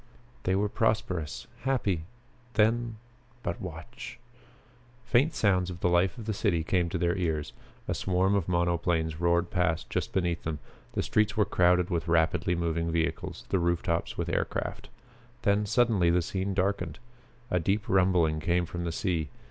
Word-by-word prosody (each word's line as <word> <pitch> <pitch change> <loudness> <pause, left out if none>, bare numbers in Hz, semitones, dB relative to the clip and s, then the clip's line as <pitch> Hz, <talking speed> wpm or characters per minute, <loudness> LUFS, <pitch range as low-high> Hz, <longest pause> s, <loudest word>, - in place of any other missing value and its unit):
They 95 - +2
were 100 +2 +2
prosperous, 100 -7 -1 0.2
happy. 105 -11 0 0.5
Then 115 +1 +2 0.5
but 85 - -3
watch!" - - -8 0.9
Faint 130 +6 +3
sounds 95 -4 +2
of 90 -1 -7
the 90 - +3
life 90 +5 +2
of 115 - -7
the 110 - -1
city 90 -5 +1
came 90 0 +1
to - - -2
their 85 -1 +1
ears. 80 -6 -1 0.3
A - - 0
swarm 95 +1 +1
of 100 -4 +1
monoplanes 85 -2 +1
roared 85 +2 +2
past 90 -4 0
just - - -1
beneath 85 -3 0
them. 80 -1 -3 0.4
The - - 0
streets 105 -1 +1
were 105 - +4
crowded 90 -1 +3
with 85 -1 -1
rapidly 85 +2 +2
moving 85 -1 -1
vehicles, 80 0 -2
the 95 - +2
roof 85 0 +1
tops 85 -1 -1
with - - -2
air - - +1
craft. - - -5 0.5
Then 100 +1 +2
suddenly 110 -6 +3
the 85 0 +3
scene 95 +3 -2
darkened; 100 +1 0 0.5
a 90 - +3
deep 100 +6 0
rumbling 90 -5 +3
came 85 +2 +1
from 85 +1 -5
the 85 - -1
sea. 80 -3 -1
90 Hz, 165 wpm, -29 LUFS, 85-100 Hz, 0.9 s, were